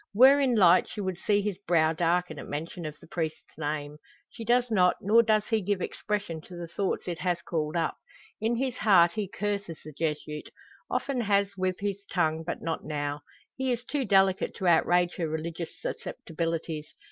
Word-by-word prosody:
Were 265 +5 +8
in 255 -3 +3
light 180 -4 +6
she - - -7
would 190 -3 -3
see 205 -1 +2
his 200 -2 -2
brow 160 -2 +4
darken 170 -1 0
at - - -8
mention 165 +3 -5
of 150 0 -8
the - - -15
priest's 160 -2 -4
name. 150 -1 -4 0.3
She 230 - -8
does 240 +1 +2
not, 180 -4 +4
nor 220 +4 +5
does 215 -2 +2
he 220 -1 +3
give 200 0 0
expression 200 -4 -3
to 180 - -12
the 175 -1 -6
thoughts 185 +4 -2
it 175 -1 -3
has 180 -2 0
called 155 -2 -2
up. 165 -1 0 0.4
In 225 +2 +1
his 255 0 -1
heart 175 -5 +5
he 210 +1 -3
curses 200 -5 -3
the 155 - -9
Jesuit 150 0 -3 0.4
often 270 -3 -1
has 200 -2 +1
with 185 0 -1
his 200 -1 -2
tongue, 160 -3 +1
but 170 - -5
not 165 -1 -2
now. 145 -1 -3 0.3
He 265 -1 -1
is 240 0 -2
too 285 0 -1
delicate 195 -3 +3
to 190 - -4
outrage 175 +1 +3
her 165 - -1
religious 160 +1 -5
susceptibilities. 165 -1 -4
180 Hz, 190 wpm, -28 LUFS, 160-205 Hz, 0.4 s, Were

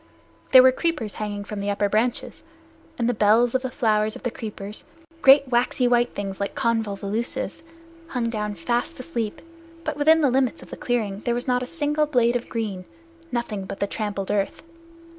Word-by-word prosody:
There 255 -1 +10
were 260 - +7
creepers 260 - -2
hanging 205 -1 -4
from 210 0 -6
the 200 +1 -2
upper 205 0 +1
branches, 225 +4 -1 0.5
and 235 - 0
the 245 - +2
bells 225 +2 +4
of 260 - +1
the 260 - -3
flowers 215 -4 +1
of - - -10
the 245 - -1
creepers, 210 -2 -7 0.4
great 275 +1 +7
waxy 245 +1 +2
white 240 0 +2
things 195 -1 -4
like 200 - -3
convolvuluses, 220 0 -2 0.5
hung 235 -5 -2
down 210 -2 -3
fast 240 - -2
asleep. 235 -6 -4 0.4
But 305 -2 -3
within 315 +2 +5
the 280 -4 +3
limits 260 -1 +1
of - - -16
the - - -5
clearing 215 -5 -1
there 235 +2 -1
was 245 - -4
not 250 -1 +2
a 250 - -4
single 300 -1 0
blade 245 -4 +2
of 245 - -2
green 205 -6 -3 0.5
nothing 225 -5 -3
but 195 - -7
the - - +1
trampled 200 -2 -3
earth. 200 +5 -1
235 Hz, 185 wpm, -24 LUFS, 210-255 Hz, 0.5 s, There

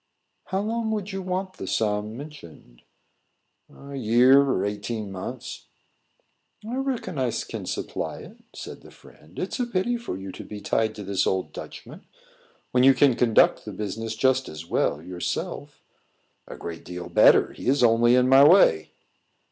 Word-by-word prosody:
"How 190 0 -2
long 225 +1 -2
would 210 -2 -3
you 195 0 -4
want 185 +1 -4
the - - -6
sum 105 0 -1
mentioned?" 85 - -12 0.9
"A 140 0 -12
year 125 +3 +5
or 135 -9 0
eighteen 105 0 -4
months." 95 -1 -7 1.0
"I 235 - -5
reckon 250 - -3
I 130 -2 +1
can - - -5
supply - - -4
it," - - -13
said - - -9
the - - -15
friend. 80 +4 -19
"It's 190 - -4
a 245 - 0
pity 235 +3 -1
for 235 - -6
you 95 0 -7
to - - -9
be 105 - -8
tied 110 +1 0
to 105 - -7
this 95 -1 0
old 95 -1 -1
Dutchman, - - -10 0.7
when 125 0 +3
you 135 0 +7
can 135 0 +4
conduct 115 -3 +3
the - - -7
business 110 +2 -4
just 130 +2 +1
as 80 +1 -8
well 75 -2 -1
yourself." 90 0 -5 0.6
"A - - -9
great 85 -1 -7
deal 90 -1 -7
better; 85 - +5
he - - -8
is 135 0 +3
only 120 +1 +5
in 125 0 +4
my 135 +1 +7
way." 150 - +5
120 Hz, 165 wpm, -25 LUFS, 100-155 Hz, 1.0 s, you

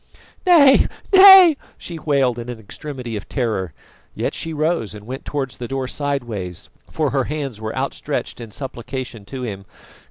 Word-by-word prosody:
"Nay, 285 -7 +7 0.3
nay!" 380 -4 +10 0.2
she 170 -2 -8
wailed 135 -6 +1
in 120 +1 -7
an 120 -2 -6
extremity 125 +2 -7
of 105 - -7
terror. 110 - -2 0.4
Yet - - -2
she 165 - -4
rose 155 - -1
and 105 0 -11
went 130 +4 -7
towards 135 -3 -4
the 120 - -5
door 135 0 -3
sideways, 120 - -4 0.2
for 155 -3 -1
her 135 -2 0
hands 140 -7 -5
were 110 0 -4
outstretched - - -3
in 115 - -8
supplication 125 -2 -7
to 130 +3 -7
him. 100 -5 -5
130 Hz, 160 wpm, -20 LUFS, 115-150 Hz, 0.4 s, nay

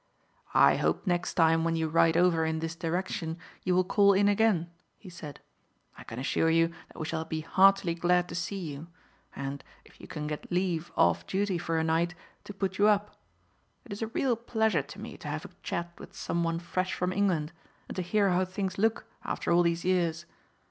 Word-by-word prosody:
"I - - +6
hope - - 0
next 175 -2 -1
time 165 -1 +4
when 165 0 +1
you 160 -1 0
ride 165 +1 +3
over 175 -2 +3
in 160 0 0
this 165 +1 -4
direction 165 -1 -3 0.2
you 180 - +1
will 185 - +4
call 200 +2 +4
in 200 +1 +3
again," 205 -5 +2 0.3
he 185 - -12
said. 150 -4 -9 0.5
"I - - -11
can 115 - -9
assure 135 +5 +1
you 165 0 +3 0.2
that - - -18
we 155 - -3
shall 160 0 -2
be 160 -1 -4
heartily 190 +1 +4
glad 175 +1 +2
to - - -7
see 175 +4 -3
you, 155 -3 -6 0.5
and, 140 +1 -5 0.2
if - - -19
you - - -10
can 150 -1 -5
get 150 +3 -5
leave 175 -2 -1
off 85 0 +3
duty 195 -2 0
for 165 -1 -1
a 160 - +1
night, 165 +2 +1 0.3
to - - -7
put 190 -1 -2
you 205 - +6
up. 210 0 +2 0.7
It 225 - -7
is 200 - -8
a 225 - -1
real 245 +2 0
pleasure 220 -1 +1
to - - -12
me - - -8
to - - -9
have - - -4
a - - -8
chat 170 0 -4
with - - -12
some 170 0 -2
one 165 0 0
fresh 185 +2 -2
from 180 +1 -1
England, 180 -6 +1 0.4
and - - -7
to 185 - -1
hear 200 +2 +2
how 180 +1 +2
things 190 0 -4
look 225 +2 +1 0.2
after - - -2
all 170 +1 +5
these 170 0 0
years. 170 -2 +1
175 Hz, 210 wpm, -29 LUFS, 165-190 Hz, 0.7 s, I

